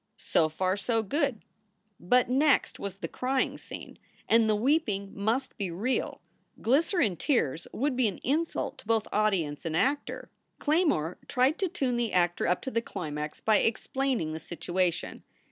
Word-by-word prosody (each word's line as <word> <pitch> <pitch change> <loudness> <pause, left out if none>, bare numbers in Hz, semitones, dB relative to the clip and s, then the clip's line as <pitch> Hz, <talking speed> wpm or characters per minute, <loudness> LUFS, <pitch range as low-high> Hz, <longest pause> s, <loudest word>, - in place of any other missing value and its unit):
So 160 -1 +2
far 185 +4 0
so 225 +2 0
good. 275 +1 -1 0.6
But 245 +8 +3
next 275 +3 +2
was 200 -2 -5
the 195 - -5
crying 260 +1 -1
scene, - - -10 0.3
and 225 -1 +4
the 215 - +4
weeping 210 -5 +1
must 225 +6 -1
be 195 -3 -1
real. 215 +10 -2 0.4
Glycerine 270 - +2
tears 165 - 0
would 275 +2 -1
be 250 -2 +3
an 195 - -3
insult 315 +6 -1
to - - -15
both 225 -2 +1
audience 190 -9 +1
and 165 -1 -1
actor. 280 - -1 0.3
Claymore 295 - +1
tried 260 +5 +2
to 385 - +1
tune 260 -7 -1
the 235 -2 -1
actor 175 -1 +2
up 180 +1 +1
to 265 - -4
the 230 - +1
climax 150 -8 -5
by 215 -1 +4
explaining 235 - 0
the 160 - -4
situation. 175 +1 -2
225 Hz, 160 wpm, -29 LUFS, 180-265 Hz, 0.6 s, and